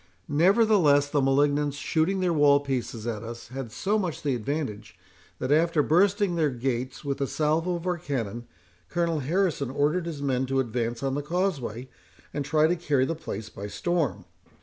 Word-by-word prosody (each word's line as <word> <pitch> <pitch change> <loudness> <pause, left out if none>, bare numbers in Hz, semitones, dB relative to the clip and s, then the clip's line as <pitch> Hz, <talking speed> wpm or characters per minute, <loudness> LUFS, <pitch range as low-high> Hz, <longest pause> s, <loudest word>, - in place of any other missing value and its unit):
Nevertheless, 165 -3 +4
the 145 - +2
malignants 145 +1 +2
shooting 170 +6 0
their 180 -2 +2
wall 145 -2 +5
pieces 125 -5 -3
at 115 -3 -3
us, 115 0 -8
had 130 -3 -6
so 200 - 0
much 180 -6 -3
the 140 -2 +1
advantage, 110 - -4 0.4
that, 130 - -3
after 160 0 +3
bursting 195 +4 +3
their 160 -3 +2
gates 130 +2 -3
with 140 0 -2
a 140 - +1
salvo 160 +5 0
of 170 0 -6
our 180 -1 -1
cannon, 120 - -4 0.4
Colonel 170 -2 0
Harrison 155 -1 0
ordered 150 +6 0
his 160 -4 -5
men 130 -2 0
to 135 0 0
advance 120 -1 -2
on 135 -1 0
the 145 - -1
causeway, 145 - -2 0.5
and 145 - -2
try 155 +2 +3
to 170 +3 +2
carry 145 -6 +1
the 165 - -1
place 110 -9 -6
by 100 -1 -7
storm. 165 - -1
145 Hz, 175 wpm, -26 LUFS, 130-170 Hz, 0.5 s, wall